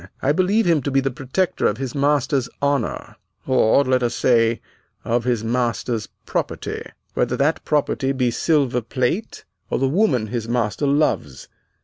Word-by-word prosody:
I 140 - +1
believe 190 +7 +2
him 165 -4 +3
to 135 - -2
be 135 0 +2
the 135 0 -1
protector 140 +8 -1
of 105 - -1
his 130 -1 -4
master's 140 -2 +1
honor, 140 -4 -1 0.3
or, 130 0 +4
let 130 -1 +1
us 120 -1 0
say, 115 -2 +3 0.5
of 120 +1 0
his 120 -3 0
master's 115 -1 -1 0.2
property, - - -3 0.3
whether - - 0
that 150 +4 +1
property 140 -2 0
be 130 -3 0
silver 135 -2 +1
plate 130 - -2 0.2
or - - 0
the 135 - +1
woman 140 - +2
his 115 +1 -4
master 120 +3 0
loves. 140 - 0
130 Hz, 155 wpm, -21 LUFS, 120-145 Hz, 0.5 s, or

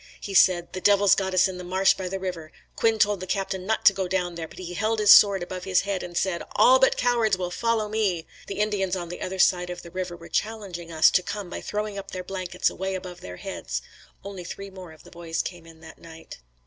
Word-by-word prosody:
He 200 - -7
said, 175 -2 +4
"The 185 - -5
devils 205 0 +5
got 190 -1 -1
us 185 - +5
in 185 -1 -7
the - - -7
marsh 190 +2 +3
by 185 -1 -5
the 195 - -3
river. 175 -4 -5 0.2
Quinn 225 -1 +2
told 205 -1 +2
the 185 - -7
Captain 190 -1 -3
not 220 - -1
to 195 - +8
go 190 -1 -2
down 180 -1 -1
there, 165 -1 -6
but - - -16
he 180 -1 -7
held 220 +4 0
his 210 -1 +5
sword 200 -3 +7
above 185 +1 -6
his 185 -1 +2
head 200 -2 -3
and 175 -1 -6
said, 185 -2 0
'All - - +6
but - - +3
cowards 230 - +2
will 180 -1 -4
follow 230 +1 0
me.'" 205 -6 -1 0.2
The 200 - -5
Indians 195 -3 0
on 175 -2 -5
the 175 - -7
other 190 +1 -4
side 180 -1 +3
of 175 0 -7
the 170 - -11
river 185 -1 -4
were 170 0 -12
challenging 195 -6 -4
us 160 -1 +5
to - - +3
come 190 0 -6
by - - -5
throwing 210 -1 -4
up 195 - -9
their 185 -1 -6
blankets 180 -1 -2
way 190 +1 -3
above 180 -1 -8
their 90 0 -9
heads. - - -5 0.4
Only 195 -2 -7
three 195 +3 -8
more 185 -3 -11
of 155 - -16
the - - -16
boys 170 -1 -3
came 175 -2 -8
in 160 -1 -16
that 160 0 -13
night. 165 -1 -12
185 Hz, 250 wpm, -25 LUFS, 175-200 Hz, 0.4 s, to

